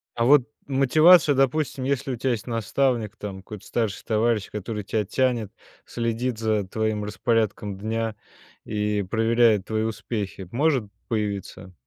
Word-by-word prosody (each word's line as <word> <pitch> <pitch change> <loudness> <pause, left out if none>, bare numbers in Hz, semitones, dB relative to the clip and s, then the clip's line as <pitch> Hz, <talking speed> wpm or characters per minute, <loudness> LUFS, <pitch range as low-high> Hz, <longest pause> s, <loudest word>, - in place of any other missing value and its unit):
А 115 - +1
вот 140 +1 +6 0.2
мотивация, 145 +3 +5
допустим, 135 0 +1
если 135 -1 -1
у - - -2
тебя 130 +3 -1
есть 120 0 -3
наставник. 115 -1 0
Там 100 -3 -6
какой-то 100 +1 -10
старший 110 -5 -2
товарищ, 110 -1 +1
который 105 +1 -5
тебя 105 +2 -1
тянет. 120 -1 0 0.3
Следит 115 0 -2
за, 110 -3 0
твоим 110 +1 -1
распорядком 105 -2 -1
дня. 110 +2 -2 0.5
И, 105 -1 -1
проверяет 115 -2 +3
твои 110 0 -1
успехи, 105 -3 -4
может 135 -3 +2 0.2
появиться? 100 -4 -4
110 Hz, 135 wpm, -24 LUFS, 105-125 Hz, 0.5 s, вот